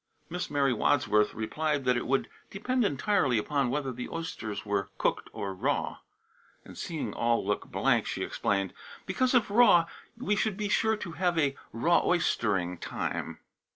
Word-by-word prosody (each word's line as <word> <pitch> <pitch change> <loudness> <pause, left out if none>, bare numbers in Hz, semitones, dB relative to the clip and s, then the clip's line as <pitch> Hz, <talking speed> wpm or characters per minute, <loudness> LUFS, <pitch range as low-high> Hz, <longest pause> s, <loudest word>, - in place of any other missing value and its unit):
Miss 180 +1 -3
Mary 140 -3 +2
Wadsworth 110 -4 +2
replied 145 +6 -1
that 125 0 +3
it 120 - -2
would 135 +1 +1 0.2
depend 250 +5 0
entirely 165 - +2
upon 135 +4 0
whether 135 0 -1
the 125 0 -6
oysters 140 -12 -5
were 100 -1 -1
cooked - - 0
or 100 -1 -4
raw; 90 - -1 0.7
and - - -12
seeing 160 -3 -4
all 115 -3 +1
look 105 +1 -1
blank, - - +1
she - - -2
explained: 100 -2 -1 0.3
"Because, 255 0 +1
if 220 -4 +3
raw, 205 -7 +6 0.3
we 230 -4 0
should 210 -1 0
be 210 -1 -2
sure 220 +1 +2
to 185 -4 -6
have 175 0 0
a 140 -3 +2 0.2
raw 170 +10 +3
oyster 120 - +2
ing 90 -1 -4
time." - - -4
145 Hz, 165 wpm, -29 LUFS, 110-190 Hz, 0.7 s, raw